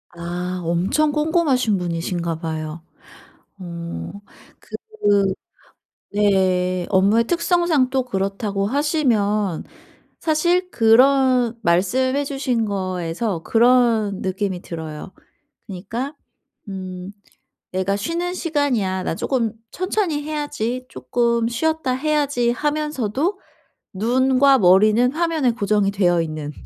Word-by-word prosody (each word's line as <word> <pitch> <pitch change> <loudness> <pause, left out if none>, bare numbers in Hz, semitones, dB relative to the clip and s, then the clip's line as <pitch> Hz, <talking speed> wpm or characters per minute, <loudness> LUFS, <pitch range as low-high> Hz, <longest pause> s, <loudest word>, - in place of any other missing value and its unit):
아. 180 +1 -4
엄청 180 - +1
꼼꼼하신 300 - +1
분이신가 170 -1 -3
봐요. 160 -1 -5 0.8
어 170 - -6 0.5
그 205 - -1 0.9
네. 185 -3 +1
업무의 205 +4 +3
특성상 340 -4 +2
또 265 -1 +1
그렇다고 195 -2 -2
하시면 215 - 0 0.6
사실 345 +3 +1
그런 250 +1 +4
말씀해 255 +11 +2
주신 265 -5 -1
거에서 185 -1 -3
그런 230 -4 +3
느낌이 190 -1 -2
들어요. 160 0 -7 0.6
그니까 225 +8 -5 0.5
음 185 0 -7 0.6
'내가 190 +2 0
쉬는 340 - -2
시간이야. 255 - -1
나 - - -1
쪼금 230 -2 -1 0.2
천천히 370 -5 -1
해야지. 290 -5 -3
쪼끔 235 - 0
쉬었다 315 +2 -1
해야지.' 285 -3 +1
하면서도 300 - -1 0.5
눈과 260 +6 +3
머리는 215 +6 +5
화면에 320 -5 +1
고정이 205 -3 +1
되어 175 -4 +2
있는 155 -2 -5
225 Hz, 220 characters per minute, -21 LUFS, 185-280 Hz, 0.9 s, 머리는